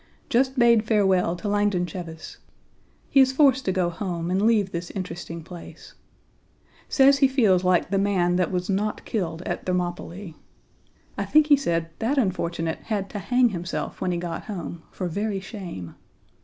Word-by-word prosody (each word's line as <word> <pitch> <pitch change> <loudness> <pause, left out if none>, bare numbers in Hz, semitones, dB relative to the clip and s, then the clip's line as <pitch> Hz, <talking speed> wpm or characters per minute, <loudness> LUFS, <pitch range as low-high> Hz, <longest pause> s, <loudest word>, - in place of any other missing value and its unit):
Just 260 +2 +2
bade 235 -3 +5
farewell 190 -5 +2
to 205 - -6
Langdon 205 -3 +1
Cheves. 170 -3 -8 0.7
He 275 - +5
is 260 -1 +6
forced 265 -1 +3
to 190 - +1
go 180 -2 0
home 175 -1 -4
and 190 +1 +1
leave 210 -3 +3
this 175 +1 -5
interesting 175 -3 -6
place. 175 +1 -11 1.0
Says 275 0 +5
he 275 - +6
feels 215 -9 +3
like 180 0 +2
the 195 - +2
man 185 -3 +2
that 180 0 0
was 180 -1 -2
not 205 +2 -1
killed 170 -5 -3
at - - -4
Thermopylae. 180 0 -3 0.9
I - - -1
think 305 0 +5
he 290 - +8
said 165 -11 -1
that 255 +6 0
unfortunate 170 -7 -1
had 200 -3 -2
to 205 - -4
hang 245 +5 +3
himself 170 -5 -5
when 185 - 0
he 175 - -1
got 170 -1 -5
home 175 -5 -6
for 185 - -4
very 200 +3 -2
shame. 190 - -8
190 Hz, 170 wpm, -24 LUFS, 175-220 Hz, 1.0 s, he